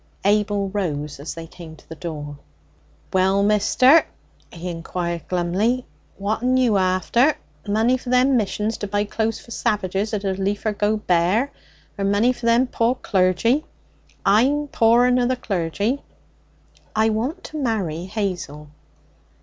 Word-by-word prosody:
Abel 205 -1 +2
rose 150 -8 -3
as 145 +4 -6
they 165 0 -7
came 165 -1 -11
to - - -21
the - - -8
door. 150 -3 -7 0.7
'Well, 190 +1 +3
mister,' 255 +8 +4 0.4
he 170 +1 -7
inquired 170 0 -4
glumly, 190 +8 0 0.3
'what'n 220 +6 0
you 240 -5 +3
after? 190 - +2 0.3
Money 225 +5 +2
for 255 - -9
them 255 +2 +4
missions 215 0 -1
to 205 - -3
buy 205 +1 0
clothes 220 +1 -2
for 235 - -15
savages 210 -3 -1
as 205 - -4
'd 190 -1 -2
liefer 200 +2 -1
go 210 +1 +1
bare? 195 +7 +1 0.5
Or - - -1
money 205 +5 +3
for 240 -1 -5
them 235 +2 +4
poor 240 0 0
clergy? 210 - +1 0.6
I'm 270 +9 +3
poorer 240 +1 +4
nor 250 -1 +2
the 255 - +1
clergy.' 205 - -2 0.9
'I 220 +1 +3
want 255 - -2
to 310 - -7
marry 185 - -1
Hazel.' 175 -7 -4
205 Hz, 140 wpm, -22 LUFS, 185-240 Hz, 0.9 s, mister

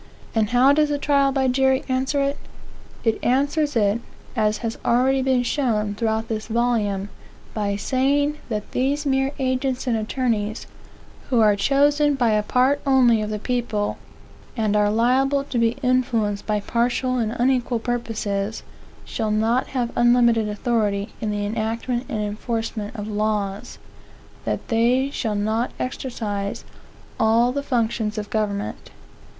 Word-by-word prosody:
And 220 -2 +1
how 250 +3 +5
does 300 0 +3
the 290 - 0
trial 280 -1 +2
by 265 -1 +1
jury 265 +1 +2
answer 265 +2 0
it? 280 +1 -1 0.6
It 225 -2 0
answers 285 +3 +1
it, 210 0 +2 0.3
as 215 -2 +1
has 225 - -3
already 260 +3 +3
been 260 -1 +2
shown 225 -6 0
throughout 220 +1 -1
this 220 -1 -4
volume, 220 -4 0 0.4
by 205 -2 -1
saying 285 +7 +1
that 210 -2 -4
these 280 +4 0
mere 270 0 +1
agents 260 -1 -1
and 245 -3 +1
attorneys, 220 -1 -1 0.6
who 250 -3 +3
are 210 -2 +5
chosen 290 +5 +3
by 240 -4 +2
a 210 0 +3
part 260 +6 +2
only 250 -5 +4
of 210 - -3
the 215 - -2
people, 215 -2 -2 0.6
and 215 -2 +1
are 210 0 +3
liable 260 +5 +2
to 255 -3 -2
be 230 +2 +1
influenced 240 -5 +1
by 210 -1 0
partial 245 +3 0
and 225 -1 -1
unequal 245 -1 +1
purposes, 225 -3 -3 0.4
shall 220 -2 -2
not 225 +4 +1
have 245 -3 -2
unlimited 235 -2 +4
authority 210 -2 -1
in 215 - -1
the 205 0 -2
enactment 230 +3 -2
and 215 -2 -2
enforcement 215 0 -4
of 210 -2 -5
laws; 210 -2 -2 0.7
that - - -3
they 245 +4 +2
shall 220 -6 -2
not 220 +4 0
exercise 215 -6 -4 0.5
all 230 +2 +3
the 280 +2 -2
functions 230 -4 -1
of 210 -1 -5
government. 205 -2 -2
235 Hz, 145 wpm, -22 LUFS, 215-260 Hz, 0.7 s, how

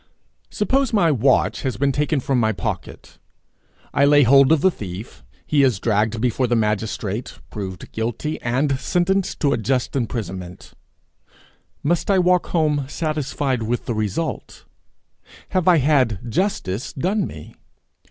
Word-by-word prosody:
Suppose 260 +4 0
my 175 -7 +4
watch 130 -1 +2
has 130 -6 -2
been 140 +1 +2
taken 150 +2 0
from 130 0 0
my 110 -1 +2
pocket; - - -6 0.7
I 140 - +3
lay 145 0 +6
hold 135 +3 +6
of 160 -3 +4
the 190 - +4
thief; 100 - -8 0.2
he 145 -2 +2
is 130 -8 +2
dragged 110 +1 0
before 125 +2 +1
the 120 - +1
magistrate, 110 0 -2
proved 95 -4 -7
guilty, 120 +7 -3
and 130 +3 0
sentenced 185 +4 0
to 140 -3 +3
a - - +1
just 125 +4 -1
imprisonment: 95 -8 -5 1.1
must 170 +6 0
I 195 - +4
walk 180 0 +3
home 150 -4 +1
satisfied 145 -5 -2
with 120 +2 -2
the 120 - -2
result? 110 - -3 0.8
Have 185 -3 0
I 175 -2 +6
had 130 -7 +2
justice 135 - -2
done 190 +7 0
me? 75 - -11
135 Hz, 145 wpm, -21 LUFS, 110-155 Hz, 1.1 s, lay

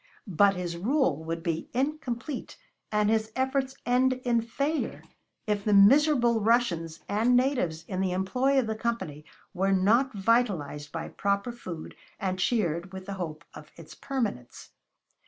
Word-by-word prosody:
But 195 0 +3
his 175 -2 -4
rule 195 - +1
would 165 0 -4
be 165 -1 -2
incomplete 270 -1 -3 0.3
and 210 -1 +2
his 220 0 +1
efforts 265 0 0
end 255 +1 +3
in 235 -1 +2
failure 280 +7 -2 0.4
if 210 -1 -1
the 210 -1 +3
miserable 240 +1 +5
Russians 185 -8 +1
and 225 +5 +2
natives 245 - 0
in 185 -1 -2
the 190 -1 0
employ 250 +10 +1
of 260 - +3
the 220 - -2
Company 190 -10 -4 0.3
were 195 +1 +1
not 225 +8 +3
vitalized 190 -9 0
by 165 +1 -4
proper 200 +4 -1
food 180 -9 -8 0.2
and 185 -1 -2
cheered 180 -4 0
with 190 -1 -8
the 200 - -5
hope 165 -4 -6
of 150 - -11
its 165 -2 -12
permanence. 225 - -4
210 Hz, 150 wpm, -28 LUFS, 175-245 Hz, 0.4 s, miserable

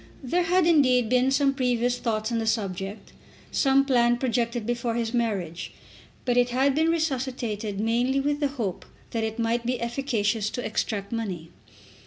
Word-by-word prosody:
There 340 +8 +1
had, 360 0 +3
indeed, 255 -8 +4
been 255 +1 +3
some 275 0 +3
previous 245 -2 0
thoughts 220 -1 -1
on 230 - 0
the 225 - -2
subject, 195 -2 -3 0.4
some 275 0 +3
plan 240 -3 +3
projected 235 -2 -1
before 235 0 -1
his 230 0 -2
marriage; 195 -8 -2 0.5
but 245 -1 +1
it 245 0 +4
had 265 +3 +2
been 315 +3 +2
resuscitated 255 -10 -2
mainly 240 +5 +1
with 290 +1 0
the 290 - +2
hope 235 -10 -4 0.3
that 225 -1 -1
it 220 0 -3
might 230 +1 0
be 245 +1 -1
efficacious 235 -4 -1
to 245 - -5
extract 205 -2 -2
money. 190 -8 -4
240 Hz, 165 wpm, -26 LUFS, 220-265 Hz, 0.5 s, indeed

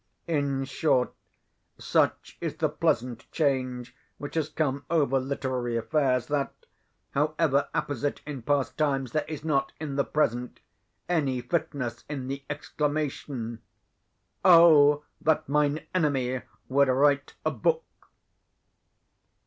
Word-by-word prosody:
In 140 -4 0
short, 135 -2 +1 0.6
such - - 0
is - - -3
the - - +1
pleasant 120 -1 -1
change 130 -5 -1 0.2
which 145 - -7
has 155 -2 0
come 140 -3 -1
over 145 -5 +2
literary 130 -3 -2
affairs, 125 0 +1
that, 145 0 -1 0.6
however 150 -1 +1
apposite 145 0 -2
in 145 -4 -6
past 140 +2 0
times, 135 -5 +1
there 155 - 0
is 155 -1 -6
not, 150 -4 0
in 145 -3 -4
the 140 - +3
present, 125 -5 -1 0.5
any 145 -7 +1
fitness 125 -5 -2
in 135 -3 -4
the 140 0 -4
exclamation, 145 -5 -3 0.8
"Oh, 155 -5 +7 0.2
that 160 0 +2
mine 150 +2 +1
enemy 135 -7 +1 0.3
would 140 +1 +4
write 140 +2 +2
a - - +2
book!" 485 0 +1
140 Hz, 115 wpm, -27 LUFS, 130-150 Hz, 0.8 s, Oh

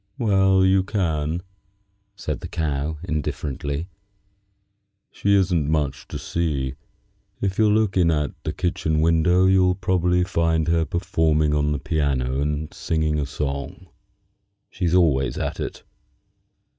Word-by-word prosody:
"Well, 95 -3 +3
you 95 0 +4
can," 85 -5 -1 0.7
said 75 -7 -4
the - - -7
Cow, 75 -1 -2
indifferently. 75 -1 -3 1.2
"She 100 0 +1
isn't 90 -6 +2
much 75 -3 -1
to - - -5
see. 70 -6 -2 0.7
If 95 0 -2
you'll 105 -1 +4
look 110 -3 +1
in 85 -2 +4
at 75 -3 0
the - - -2
kitchen 80 -3 -1
window 85 +3 +3
you'll 95 -1 +4
probably 90 -1 +1
find 85 -3 +1
her 85 -1 +2
performing 80 -3 +1
on 75 0 +1
the 75 - 0
piano 70 -3 -1
and 75 +1 -2
singing 80 -2 -1
a 70 - -2
song. 70 +6 -5 0.8
She's 90 -2 0
always 75 -7 +2
at - - -3
it." - - -5
80 Hz, 130 wpm, -23 LUFS, 75-90 Hz, 1.2 s, you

